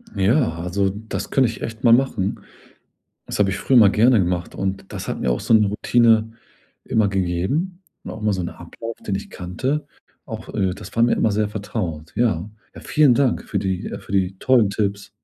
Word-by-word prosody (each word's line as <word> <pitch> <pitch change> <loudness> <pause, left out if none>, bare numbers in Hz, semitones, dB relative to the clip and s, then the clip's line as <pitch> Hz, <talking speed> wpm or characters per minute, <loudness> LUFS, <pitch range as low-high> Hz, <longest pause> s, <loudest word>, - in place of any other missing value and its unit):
Ja. 105 - +2
Also, 95 +3 0
das 105 +3 -5
könnte 130 -4 +3
ich 115 - -8
echt 115 +2 -6
mal 115 -2 +6
machen. 115 -6 +1 0.9
Das - - -5
habe 100 -1 +3
ich 95 - -3
früher 130 +6 +2
immer 110 -5 +8
gerne 115 +3 +4
gemacht, 90 -2 -1
und 95 0 -4
das - - -6
hat - - -3
mir 65 - 0
auch - - 0
so - - 0
'ne 105 -1 +5
Routine 110 +2 +3 0.5
immer 110 -2 +2
gegeben 95 - -1 0.2
und - - -6
auch 110 - -8
immer 105 -1 +2
so 95 - -2
'n 85 - -3
Ablauf, 115 +8 -8
den 100 - -1
ich 95 - -5
kannte. 130 +12 -3 0.4
Auch - - -8
äh, 95 - +1
das 105 0 -11
war 115 - +3
mir 120 - +4
immer 110 - +1
sehr 105 0 0
vertraut. 95 -7 -5
Ja, 105 -6 +1 0.3
ja, - - -10
vielen 150 -5 +4
Dank 135 -1 +1
für 100 - -2
die 95 -2 -2
für - - -11
die 95 -1 0
tollen 120 -5 +3
Tipps. 100 -1 -2
105 Hz, 205 wpm, -21 LUFS, 95-115 Hz, 0.9 s, immer